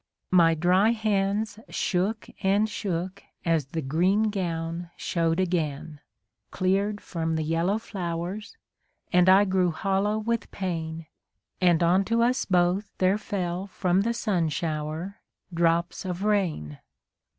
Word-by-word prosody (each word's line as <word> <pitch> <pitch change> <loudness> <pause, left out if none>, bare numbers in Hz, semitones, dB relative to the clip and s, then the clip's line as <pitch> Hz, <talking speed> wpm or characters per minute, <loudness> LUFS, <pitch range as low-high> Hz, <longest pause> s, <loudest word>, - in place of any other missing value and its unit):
My 165 -3 +5
dry 185 +7 +3
hands 210 -1 0
shook 200 +4 -1 0.2
and 200 +3 +3
shook 190 -3 -4 0.2
as 165 -5 +1
the 160 +2 -4
green 185 +10 +2
gown 170 -3 -3
show'd 165 0 0
again, 160 -4 -2 0.5
Cleared 200 +3 0
from 165 -4 -3
the 160 - -1
yellow 165 +6 +1
flowers, 185 0 -5 0.6
and 180 +1 +5
I 195 +2 +7
grew 185 -2 +2
hollow 195 +4 0
with 225 0 -2
pain, 165 -4 -4 0.6
And 175 -2 +4
on 180 +3 +4
to 230 +2 +2
us 250 +2 +1
both 185 +2 +1
there 190 +3 +2
fell 185 -3 -3
from 185 -1 +1
the 235 +3 0
sun 185 -8 0
shower 155 +5 -3 0.3
drops 170 0 +1
of 185 0 -4
rain. 175 - 0
185 Hz, 130 wpm, -26 LUFS, 165-205 Hz, 0.6 s, I